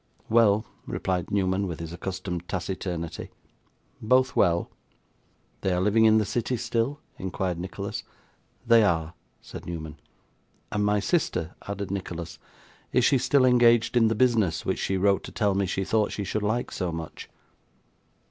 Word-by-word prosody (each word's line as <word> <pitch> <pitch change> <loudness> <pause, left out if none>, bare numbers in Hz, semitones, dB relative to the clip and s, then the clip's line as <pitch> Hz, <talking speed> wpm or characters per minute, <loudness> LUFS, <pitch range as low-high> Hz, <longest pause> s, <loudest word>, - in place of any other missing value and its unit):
'Well,' 110 -2 +4 0.2
replied 90 -3 -2
Newman, 95 0 +1
with 85 -3 -5
his 85 0 -6
accustomed 90 -1 -5
taciturnity; 90 -2 -4 0.7
'both 130 +3 +3
well.' 85 -2 +2 0.9
'They 95 - +1
are - - +1
living 105 +4 +4
in 110 0 +6
the 110 - +2
city 120 +4 -1
still?' 120 +6 -1 0.2
inquired 95 -1 -2
Nicholas. 90 +2 -5 0.6
'They 115 -1 +6
are,' 80 -4 +1 0.3
said - - -10
Newman. 80 -3 -6 0.7
'And 105 - 0
my 105 0 +2
sister,' 100 - 0
added 100 -1 -4
Nicholas. 85 -3 -5 0.5
'Is 125 -1 +3
she 135 -1 +4
still 130 +1 +3
engaged 120 -2 +4
in 115 -2 +5
the 110 - +1
business 110 -8 +2
which - - -1
she 95 - 0
wrote 100 +1 +2
to - - -8
tell 105 -3 +1
me 100 0 0
she 95 +1 -1
thought 110 +1 +1
she 105 - -3
should 105 +2 -2
like 110 +4 -1
so 90 -3 -2
much? 80 -1 -7
100 Hz, 155 wpm, -26 LUFS, 90-115 Hz, 0.9 s, in